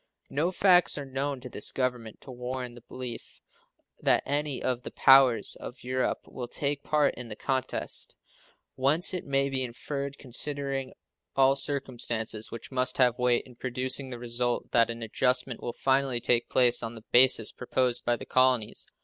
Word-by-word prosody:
No 160 Hz, +6 st, 0 dB
facts 180 Hz, -3 st, +4 dB
are 145 Hz, -, -5 dB
known 135 Hz, 0 st, -3 dB
to 125 Hz, -, -7 dB
this 105 Hz, -, -3 dB
Government 125 Hz, -4 st, -3 dB
to 135 Hz, -, -11 dB
warrant 125 Hz, 0 st, -5 dB
the 120 Hz, -, -13 dB
belief 125 Hz, 0 st, -8 dB, 0.6 s
that -, -, +2 dB
any 145 Hz, -1 st, 0 dB
of 125 Hz, -1 st, -1 dB
the -, -, -7 dB
powers 135 Hz, -3 st, +5 dB
of 125 Hz, -, -9 dB
Europe 130 Hz, 0 st, -1 dB
will 125 Hz, -2 st, -7 dB
take 140 Hz, +3 st, -1 dB
part 150 Hz, -1 st, +2 dB
in 125 Hz, -2 st, -7 dB
the 105 Hz, -, -5 dB
contest, 130 Hz, +2 st, -2 dB, 0.6 s
whence 145 Hz, +8 st, +2 dB
it 180 Hz, -, -4 dB
may 140 Hz, 0 st, +2 dB
be 135 Hz, -1 st, 0 dB
inferred, 140 Hz, +3 st, -5 dB
considering 135 Hz, 0 st, -3 dB, 0.4 s
all 135 Hz, 0 st, +5 dB
circumstances 120 Hz, -6 st, -2 dB
which 115 Hz, -, -9 dB
must 130 Hz, -1 st, 0 dB
have 125 Hz, -2 st, +3 dB
weight 125 Hz, -1 st, +2 dB
in 125 Hz, -, -14 dB
producing 130 Hz, +2 st, -3 dB
the 125 Hz, -, -6 dB
result, 120 Hz, 0 st, -2 dB
that 115 Hz, -1 st, +4 dB
an 115 Hz, 0 st, -5 dB
adjustment 125 Hz, +2 st, 0 dB
will 120 Hz, -, -3 dB
finally 135 Hz, -1 st, +1 dB
take 120 Hz, 0 st, +1 dB
place 120 Hz, -1 st, +3 dB
on 115 Hz, 0 st, -5 dB
the 110 Hz, 0 st, -13 dB
basis 125 Hz, -3 st, +5 dB
proposed 125 Hz, -1 st, 0 dB
by 120 Hz, -, +1 dB
the -, -, -9 dB
colonies. 130 Hz, -4 st, +1 dB
130 Hz, 170 wpm, -28 LUFS, 120-135 Hz, 0.6 s, powers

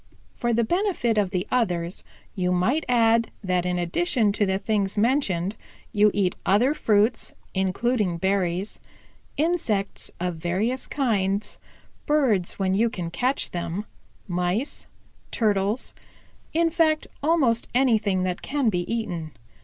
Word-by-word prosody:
For 240 Hz, -, -1 dB
the 235 Hz, 0 st, +2 dB
benefit 345 Hz, -, +1 dB
of 200 Hz, -3 st, +1 dB
the 185 Hz, -1 st, -2 dB
others 180 Hz, -8 st, 0 dB, 0.3 s
you 180 Hz, -3 st, 0 dB
might 225 Hz, -, +1 dB
add 230 Hz, -1 st, +4 dB
that 180 Hz, -1 st, 0 dB
in 180 Hz, 0 st, 0 dB
addition 215 Hz, -, +1 dB
to 205 Hz, 0 st, 0 dB
the 190 Hz, 0 st, +1 dB
things 200 Hz, -1 st, -1 dB
mentioned 205 Hz, -6 st, +1 dB, 0.4 s
you 210 Hz, 0 st, +5 dB
eat 190 Hz, -3 st, +1 dB
other 235 Hz, +9 st, +3 dB
fruits, 220 Hz, -3 st, +1 dB, 0.2 s
including 190 Hz, 0 st, 0 dB
berries, 190 Hz, +1 st, -1 dB, 0.6 s
insects 285 Hz, -, 0 dB
of 180 Hz, -1 st, -2 dB
various 195 Hz, +10 st, -1 dB
kinds, 210 Hz, -6 st, -1 dB, 0.5 s
birds 255 Hz, -12 st, +2 dB
when 190 Hz, -1 st, +1 dB
you 225 Hz, +4 st, +3 dB
can 175 Hz, -6 st, -5 dB
catch 255 Hz, +8 st, -1 dB
them, 175 Hz, +3 st, -3 dB, 0.4 s
Mice, 180 Hz, +8 st, -2 dB, 0.4 s
Turtles, 210 Hz, +1 st, 0 dB, 0.6 s
in 330 Hz, +1 st, +2 dB
fact 315 Hz, -2 st, +2 dB, 0.2 s
almost 280 Hz, -7 st, +2 dB
anything 220 Hz, -7 st, +2 dB
that 180 Hz, -1 st, -2 dB
can 275 Hz, -4 st, 0 dB
be 180 Hz, -1 st, -2 dB
eaten. 175 Hz, -9 st, -3 dB
210 Hz, 130 wpm, -25 LUFS, 185-245 Hz, 0.6 s, you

